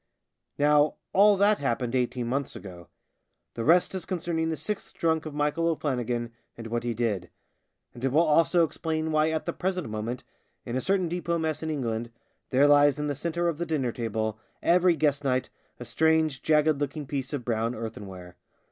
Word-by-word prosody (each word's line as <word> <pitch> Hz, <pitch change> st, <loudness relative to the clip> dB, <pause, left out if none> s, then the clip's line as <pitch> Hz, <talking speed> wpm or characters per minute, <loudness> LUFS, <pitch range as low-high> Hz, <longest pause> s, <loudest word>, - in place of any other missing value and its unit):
Now 150 Hz, +1 st, +4 dB, 0.2 s
all 205 Hz, +1 st, +6 dB
that 205 Hz, +2 st, +4 dB
happened 125 Hz, -2 st, -1 dB
eighteen 125 Hz, -1 st, 0 dB
months 135 Hz, +3 st, -2 dB
ago. 90 Hz, -3 st, -10 dB, 0.7 s
The 115 Hz, -, -4 dB
rest 175 Hz, +7 st, +4 dB
is 190 Hz, -, -3 dB
concerning 165 Hz, -3 st, -2 dB
the 160 Hz, -, -2 dB
sixth 205 Hz, +8 st, -5 dB
drunk 160 Hz, -1 st, 0 dB
of 150 Hz, -, -8 dB
Michael 150 Hz, +3 st, 0 dB
O'Flannigan 125 Hz, -7 st, -1 dB, 0.3 s
and 115 Hz, -, -8 dB
what 115 Hz, +1 st, -2 dB
he 120 Hz, -1 st, -2 dB
did; 105 Hz, -7 st, -1 dB, 0.6 s
and 120 Hz, -, -11 dB
it 135 Hz, -, +1 dB
will 155 Hz, +5 st, +4 dB
also 165 Hz, +3 st, +4 dB
explain 160 Hz, 0 st, -3 dB
why 155 Hz, 0 st, +3 dB
at 160 Hz, -1 st, -2 dB
the -, -, -2 dB
present 185 Hz, -6 st, -2 dB
moment, 110 Hz, +3 st, -4 dB, 0.4 s
in 120 Hz, -, -4 dB
a 130 Hz, -, 0 dB
certain 190 Hz, +1 st, +1 dB
depot 170 Hz, 0 st, -1 dB
mess 160 Hz, -2 st, -2 dB
in 160 Hz, -, -3 dB
England, 120 Hz, -6 st, -2 dB, 0.4 s
there 135 Hz, +2 st, +4 dB
lies 145 Hz, -1 st, +5 dB
in 150 Hz, -, -2 dB
the 145 Hz, -, -1 dB
centre 170 Hz, +4 st, -2 dB
of 165 Hz, -2 st, -2 dB
the 170 Hz, -, -1 dB
dinner 140 Hz, -6 st, 0 dB
table, 110 Hz, -2 st, -3 dB, 0.2 s
every 180 Hz, 0 st, +4 dB
guest 145 Hz, -1 st, +1 dB
night, 130 Hz, -2 st, 0 dB, 0.3 s
a -, -, -7 dB
strange 160 Hz, -3 st, +2 dB
jagged 155 Hz, -1 st, +3 dB
looking 145 Hz, +1 st, -3 dB
piece 135 Hz, -1 st, -4 dB
of 140 Hz, -5 st, -4 dB
brown 115 Hz, 0 st, -1 dB
earthenware. 95 Hz, -5 st, -8 dB
145 Hz, 185 wpm, -27 LUFS, 120-160 Hz, 0.7 s, all